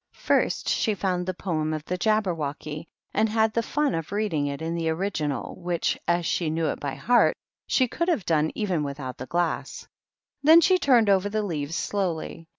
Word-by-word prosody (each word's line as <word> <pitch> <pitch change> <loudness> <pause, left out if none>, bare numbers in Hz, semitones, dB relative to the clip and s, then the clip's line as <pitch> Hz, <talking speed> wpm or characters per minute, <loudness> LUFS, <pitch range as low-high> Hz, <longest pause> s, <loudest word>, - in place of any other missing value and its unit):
First - - +1
she 215 -3 +1
found 180 -2 -1
the 185 - -1
poem 155 -4 -2
of 155 -1 -6
the 180 - -2
Johberwochy 165 -7 -1 0.3
and 220 +1 +2
had 220 0 +2
the 230 - +1
fun 290 +4 0
of 165 0 -4
reading 200 -9 0
it 140 0 -4
in 165 +1 -3
the 165 -1 -1
original 160 -6 -2
which, 175 -1 0
as 170 0 +1
she 165 0 0
knew 160 +1 -1
it - - -3
by 140 -2 -4
heart, 245 0 +3 0.3
she 255 - +3
could 340 +8 -2
hav 325 - +1
done 155 -1 +2
even 190 -7 0
without 140 -3 -5
the 130 - -6
glass. 170 +1 -2 0.5
Then 315 +4 +8
she 370 +3 +4
turner 235 - +4
over 195 +1 +1
the 215 +1 -1
leaves 160 -5 -3
slowly. 170 -5 -3
175 Hz, 190 wpm, -25 LUFS, 155-215 Hz, 0.5 s, Then